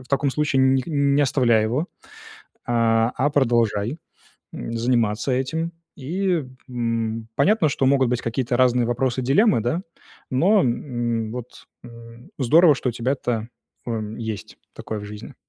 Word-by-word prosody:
в 130 - -20
таком 140 0 +1
случае 145 -2 +1
ни 130 0 +3
не 140 -2 +2
оставляй 120 -5 +3
его, 130 +10 -1 0.8
а 115 -1 +2
а 145 +2 +1
продолжай, 120 -1 +1 0.5
м, 115 - -6
заниматься 115 0 0
этим. 160 +6 -2 0.2
И, 175 +2 -1 0.2
м, 115 -2 -2
понятно, 205 -6 +3
что 135 -1 0
могут 135 -2 +3
быть 125 - 0
какие-то 120 +1 -1
разные 125 -1 +3
вопросы, 125 +1 -1
дилеммы, 150 - +3
да, 155 +10 -1 0.5
но, 190 +11 +4
м, 120 -3 -2
вот, 125 0 -9 0.2
м, 115 0 -13
здорово, 155 +4 +5
что 130 - -2
у - - -8
тебя-то, 120 -2 -2 0.4
м, 110 -2 -4
есть 110 -3 -6 0.2
такое 110 -1 -6
в 105 - -8
жизни. 105 0 -9
125 Hz, 145 wpm, -22 LUFS, 115-140 Hz, 0.8 s, здорово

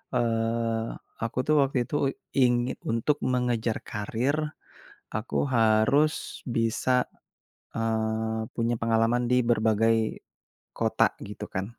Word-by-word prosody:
eee, 115 -1 0 0.4
aku 115 - -4
tuh 155 - +4
waktu 135 -1 +1
itu 145 - -5 0.4
ingin 120 0 +2
untuk 115 +6 +1
mengejar 120 -3 0
karier, 115 +8 -1 0.8
aku 110 - -3 0.2
harus 115 +7 +2
bisa, 115 +2 0 0.9
eee, 110 0 -1
punya 120 0 0
pengalaman 115 +1 +2
di - - +5
berbagai, 115 0 +3 0.8
kota - - +3 0.2
gitu - - -7
kan, 95 +1 -3
115 Hz, 100 wpm, -27 LUFS, 110-120 Hz, 0.9 s, di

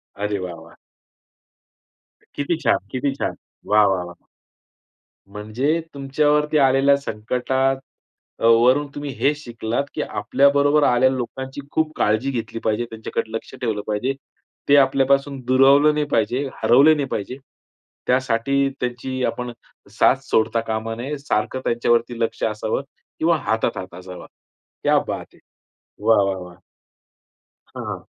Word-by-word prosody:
अरे 105 0 -2
वाह, 90 -2 -5
वाह! 80 0 -15 1.6
किती 145 +4 -1
छान! - - +4
किती 135 +2 -1
छान! - - -3 0.4
वाह, 105 0 +6
वाह, 95 -2 0
वाह! 90 0 -13 1.1
म्हणजे 110 +10 -1
तुमच्यावरती 150 +2 +1
आलेल्या 135 0 +4
संकटात 130 +2 -1 0.6
वरून 120 +5 +4
तुम्ही 145 0 -5
हे 145 - +3
शिकलात 120 -3 -3
की - - -3
आपल्याबरोबर 140 +2 +2
आलेल्या 125 0 +4
लोकांची 130 +2 -5
खूप 160 -1 0
काळजी 110 +6 +1
घेतली 115 -2 -4
पाहिजे. 110 +2 0
त्यांच्याकडे 110 0 -4
लक्ष 115 - -6
ठेवलं 110 -4 -1
पाहिजे. 110 +5 -1 0.6
ते 145 - +7
आपल्यापासून 135 0 +2
दुरावलं 135 +3 +5
नाही 150 0 0
पाहिजे, 120 +5 +1 0.2
हरवलं 140 +6 +6
नाही 145 -2 -2
पाहिजे. 125 +2 -4 0.7
त्यासाठी 130 +2 +1
त्यांची 125 +1 -3
आपण 125 0 -3 0.5
साथ - - +6
सोडता 110 -3 +1
कामा 110 +1 -2
नये. 135 +6 -4
सारखं 130 -2 -2
त्यांच्यावरती 120 0 +1
लक्ष 115 - -2
असावं 110 +2 -1 0.4
किंवा 165 +1 +3
हातात 110 -6 -1
हात 95 -1 -7
असावा. 90 0 -10 0.6
क्या - - +4
बात - - -4
है! - - -22 0.7
वाह! 115 -3 +5
वाह! 95 -1 -1
वाह! 90 -1 -13 1.2
हां, - - -5
125 Hz, 130 wpm, -21 LUFS, 110-140 Hz, 1.6 s, ते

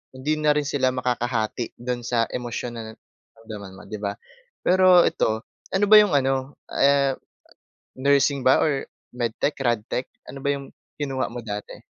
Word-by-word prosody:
hindi 140 +4 -1
na 150 -1 +3
rin 150 - +1
sila 130 -3 +1
makakahati, 120 -2 -2
do'n 120 0 -3
sa 115 -1 +1
emosyon 120 0 -4
na 110 -1 -7
naramdaman 110 -4 -13
mo, - - -11
'di 110 - -5
ba? 100 -1 -2 0.5
Pero 185 -1 +6
ito, 110 -6 -1 0.3
ano 195 +2 +3
ba 215 - +9
'yong 210 -5 +5
ano, 135 0 0 0.2
ah, 140 -1 +3 0.8
nursing 140 0 +2
ba, 130 - +5
or 140 -3 0 0.3
medtech, 120 +4 -1
radtech, 120 -1 -1 0.2
ano 135 - -8
ba - - +1
'yong 140 -1 -8 0.3
kinuha 135 -2 -1
mo 120 - -5
dati? 105 -2 -7
130 Hz, 155 wpm, -24 LUFS, 115-140 Hz, 0.8 s, ba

